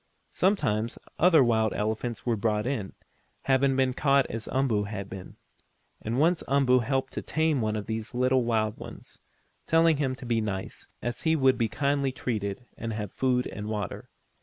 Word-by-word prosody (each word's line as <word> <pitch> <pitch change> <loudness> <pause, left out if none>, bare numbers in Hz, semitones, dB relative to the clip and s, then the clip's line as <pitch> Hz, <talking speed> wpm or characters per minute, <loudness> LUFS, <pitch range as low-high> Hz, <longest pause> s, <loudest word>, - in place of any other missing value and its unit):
Sometimes 125 - +1 0.2
other 165 -4 +6
wild 110 -3 +2
elephants 110 +2 -2
were 120 -2 +2
brought 105 0 0
in, 120 -7 -3 0.5
having 135 0 +3
been 130 -1 +2
caught 140 0 +3
as 110 0 -5
Umboo 125 -6 +1
had 100 -2 -5
been. 95 -1 -9 0.7
And 115 +4 -2
once 165 +3 +3
Umboo 135 -2 +4
helped 135 +2 -1
to - - -3
tame 160 -3 0
one 110 -1 0
of 105 -1 -3
these 110 +1 -4
little 130 0 +3
wild 110 -2 0
ones, - - -11 0.5
telling 165 -1 +4
him 135 -3 0
to 130 - -10
be 115 -2 +1
nice, 100 -3 -5 0.2
as 120 0 -3
he 160 -1 +2
would 135 -3 +4
be 115 -1 +1
kindly 140 +2 0
treated 110 -3 -3
and 115 -1 -4
have 105 -2 -4
food 125 -1 +1
and 105 0 -6
water. 105 -2 -4
125 Hz, 175 wpm, -27 LUFS, 110-135 Hz, 0.7 s, other